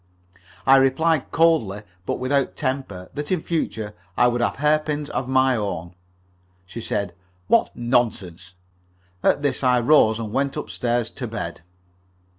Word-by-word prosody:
I 135 0 +7
replied 135 +3 +2
coldly, 150 -12 +2 0.2
but - - 0
without 135 +1 0
temper, 130 -9 -4
that 145 +2 -4
in 180 -4 0
future 110 -10 -2 0.2
I 125 - +5
would 120 0 -1
have - - 0
hairpins 150 0 0
of 130 - -2
my 130 0 +3
own. 90 -5 -4 0.7
She 105 +6 -8
said: 100 -4 -2 0.3
"What - - +3
nonsense!" 100 -8 -1 0.7
At 145 - +2
this 145 - 0
I 125 -1 +4
rose, 115 -4 +4
and 110 -2 -5
went 140 0 0
up - - -5
stairs 120 -1 -1
to - - -6
bed. - - -5
125 Hz, 145 wpm, -23 LUFS, 110-145 Hz, 0.7 s, I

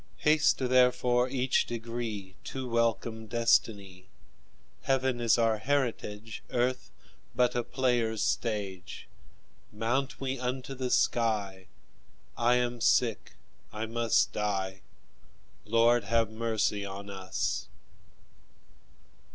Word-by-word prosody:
Haste 150 0 +3
therefore 125 -1 +3
each 130 -1 +1
degree 115 -4 -5
To 130 -1 -5
welcome 115 -1 -1
destiny; 105 -5 +1 0.7
Heaven 130 -2 0
is 115 -2 +4
our 115 -2 +2
heritage, 115 -5 -2
Earth 125 +1 -1 0.5
but 125 0 +3
a 120 - 0
player's 120 -4 0
stage. 95 -6 -3 0.6
Mount 130 +5 -1
we 135 -1 -3
unto 130 +1 -3
the 130 -1 -3
sky; 105 -7 0 0.7
I 120 +1 +3
am 120 -1 -1
sick, 115 -4 +2 0.4
I 110 +1 -4
must 115 0 +1
die 95 -2 -2 0.8
Lord, 115 +1 +3
have 115 +1 +1
mercy 110 -2 -1
on 100 +1 -7
us! 95 -1 -3
115 Hz, 100 wpm, -29 LUFS, 105-125 Hz, 0.8 s, is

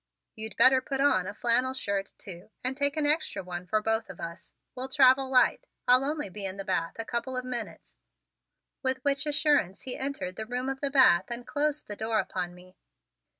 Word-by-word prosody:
You'd 220 0 -6
better 260 0 +6
put 270 0 -4
on 190 -10 +3
a 205 - -5
flannel 250 +3 +2
shirt, 200 -5 -3
too, 185 -2 -10
and 255 +1 -1
take 285 +2 +1
an 305 - +1
extra 300 - +1
one 180 0 -6
for 215 +2 0
both 225 0 0
of 175 - -10
us. 170 0 -8 0.2
We'll 255 +1 -2
travel 265 -1 +5
light. 255 -1 +3 0.2
I'll 250 +1 +6
only 295 -1 -1
be 200 +2 -4
in 190 0 -3
the 195 - -6
bath 170 -4 -1
a 225 - -4
couple 255 +2 -3
of 255 - -3
minutes." 240 -3 -6 0.8
With 260 -1 0
which 280 +1 0
assurance 290 - +1
he 255 - -2
entered 265 -10 -4
the 220 - -5
room 250 +2 -3
of 270 0 -4
the 280 - 0
bath 255 -11 +5
and 240 0 -5
closed 295 +1 -1
the 205 - -5
door 220 +1 -1
upon 180 -4 -3
me. 185 +1 -17
250 Hz, 205 wpm, -28 LUFS, 195-270 Hz, 0.8 s, better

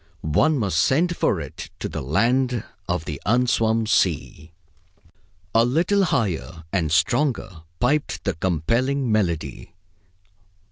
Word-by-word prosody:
One 145 - +2
must 100 -8 0
send 170 - +2
for 95 - +1
it 70 -4 -8
to - - -4
the - - -5
land 120 - +1 0.3
of 90 -2 -1
the 75 -2 -6
unswum 115 -1 +2
sea. 80 -5 0 1.0
A 115 - +5
little 175 +11 +2
higher 90 - -2
and 85 -6 0
stronger 105 - +1 0.2
piped 145 +4 0
the 100 - 0
compelling 115 - 0
melody. 85 - -2
110 Hz, 120 wpm, -23 LUFS, 80-130 Hz, 1.0 s, A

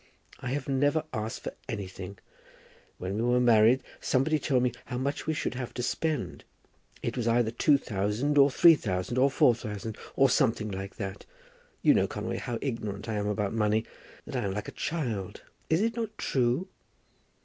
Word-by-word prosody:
I - - -6
have 140 -1 -3
never 145 +3 +2
asked 110 -1 -4
for - - -4 0.2
anything. 95 -2 -6 0.8
When 95 +3 -3
we - - 0
were 120 +1 +3
married 120 +1 +5 0.2
somebody 150 +4 +1
told 130 -3 +1
me 125 - +2
how 125 - -4
much 140 +4 -2
we 160 - +1
should - - -2
have 125 -1 -6
to 125 - -2
spend. 155 +2 -2 0.6
It - - -2
was 120 -2 -1
either 115 -1 +3
two 140 +5 +4
thousand, 105 +5 -1
or 140 0 +7
three 165 +5 +7
thousand, 105 - -2
or 135 +2 +5
four 125 - +5
thousand, 110 -2 -6 0.2
or 135 - +5
something 115 -5 +1
like 95 +1 -6
that. 100 -3 -6 0.6
You - - +7
know, - - +3
Conway, - - -4
how 120 - -3
ignorant 110 -6 -4
I 110 - -2
am 105 -1 -1
about 105 -1 -1
money; 110 0 +1 0.4
that - - -7
I 125 -4 0
am 95 - -2
like 105 - -4
a - - -5
child. 120 - -3 0.3
Is 160 +4 +3
it 230 +1 +1
not 220 -2 -4
true?" 130 +7 +1
120 Hz, 185 wpm, -29 LUFS, 105-140 Hz, 0.8 s, or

